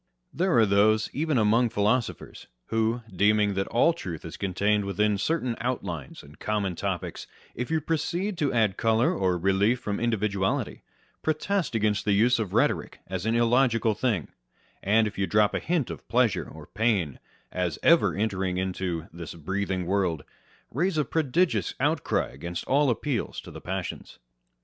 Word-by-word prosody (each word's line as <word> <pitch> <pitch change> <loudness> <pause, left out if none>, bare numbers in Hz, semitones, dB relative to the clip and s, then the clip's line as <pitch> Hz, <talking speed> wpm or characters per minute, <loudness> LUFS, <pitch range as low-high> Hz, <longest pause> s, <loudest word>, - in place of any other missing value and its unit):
There 180 -5 +2
are 115 - +6
those 105 +2 +3
(even 155 0 0
among 115 +2 +3
philosophers) 115 +2 -1 0.2
who, 115 +2 0
deeming 105 +1 +3
that 95 0 -1
all 145 +8 +3
truth 90 - -7
is 85 - -7
contained 100 +2 0
within 100 +1 0
certain 130 -2 0
outlines 100 - -4
and 75 +1 -16
common 100 -4 -1
topics, 95 -2 -4 0.3
if 125 +1 -4
you 160 0 +1
proceed 170 +6 -2
to 145 -4 +1
add 110 -5 +1
colour 115 +1 +2
or 95 -2 +1
relief 95 +7 +2
from 105 -4 -3
individuality, 105 -4 -1 0.4
protest 160 0 -1
against 105 -1 +1
the 105 - +2
use 120 +4 +3
of 105 -5 -2
rhetoric - - +1
as 95 +2 -4
an 115 - +2
illogical 120 -1 +3
thing; 105 - -1 0.5
and 110 +3 +3
if 105 -2 -5
you 95 - +1
drop 105 -1 +3
a - - 0
hint 160 - -1
of 80 - -9
pleasure - - +1
or - - -11
pain 100 - 0 0.3
as 90 -4 -2
ever 170 0 +5
entering 95 -3 -1
into 90 -3 -2
" - - -32
this 85 -1 -8
breathing 95 +2 -2
world*" 90 -6 0 0.5
raise 170 +6 0
a 150 - +2
prodigious 150 - 0
outcry - - 0
against 85 +6 -6
all 140 +1 +3
appeals 120 0 -2
to - - -10
the - - -10
passions. 95 0 -5
105 Hz, 165 wpm, -26 LUFS, 95-125 Hz, 0.5 s, are